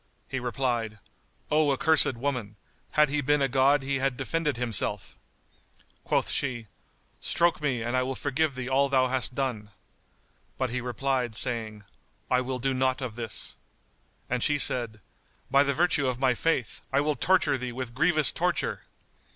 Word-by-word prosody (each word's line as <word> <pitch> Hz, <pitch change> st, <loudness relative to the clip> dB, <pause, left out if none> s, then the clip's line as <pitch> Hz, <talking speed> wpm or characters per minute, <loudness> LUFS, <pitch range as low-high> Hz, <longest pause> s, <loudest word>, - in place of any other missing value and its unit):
He 130 Hz, -, -3 dB
replied, 120 Hz, -3 st, -2 dB, 0.5 s
"O 150 Hz, -1 st, +3 dB
accursed 155 Hz, -1 st, +4 dB
woman, 120 Hz, -5 st, -3 dB, 0.4 s
had 150 Hz, -1 st, +4 dB
he 150 Hz, +1 st, 0 dB
been 145 Hz, +2 st, +2 dB
a -, -, +3 dB
god 135 Hz, +2 st, +3 dB
he 135 Hz, 0 st, -1 dB
had 135 Hz, -1 st, 0 dB
defended 150 Hz, +2 st, -1 dB
himself!" 115 Hz, -6 st, -2 dB, 0.9 s
Quoth -, -, +1 dB
she, 125 Hz, -5 st, -2 dB, 0.5 s
"Stroke 170 Hz, -2 st, +1 dB
me 130 Hz, -6 st, -1 dB
and 120 Hz, +2 st, -2 dB
I 130 Hz, -, +3 dB
will 130 Hz, +1 st, -2 dB
forgive 145 Hz, +1 st, -1 dB
thee 130 Hz, -1 st, -4 dB
all 135 Hz, +1 st, +2 dB
thou 130 Hz, -2 st, +3 dB
hast 125 Hz, -2 st, -1 dB
done." 125 Hz, -6 st, -2 dB, 0.9 s
But 130 Hz, -2 st, -1 dB
he 125 Hz, +1 st, -2 dB
replied, 125 Hz, -1 st, -1 dB
saying, 110 Hz, -4 st, -3 dB, 0.5 s
"I 125 Hz, 0 st, +4 dB
will 130 Hz, 0 st, -3 dB
do 135 Hz, +2 st, -1 dB
nought 130 Hz, 0 st, +1 dB
of 125 Hz, -5 st, -5 dB
this." 115 Hz, -6 st, -1 dB, 0.7 s
And 125 Hz, -1 st, -1 dB
she 150 Hz, -, +3 dB
said, 115 Hz, -6 st, 0 dB, 0.5 s
"By 135 Hz, +1 st, +6 dB
the 140 Hz, -1 st, +1 dB
virtue 165 Hz, -5 st, +2 dB
of 125 Hz, -2 st, -1 dB
my 130 Hz, 0 st, +2 dB
faith, 125 Hz, -3 st, -1 dB
I 135 Hz, -, +3 dB
will 150 Hz, +1 st, +1 dB
torture 185 Hz, -6 st, +2 dB
thee 125 Hz, 0 st, -4 dB
with 125 Hz, -1 st, -5 dB
grievous 155 Hz, +2 st, +2 dB
torture!" -, -, -1 dB
130 Hz, 165 wpm, -27 LUFS, 120-140 Hz, 0.9 s, By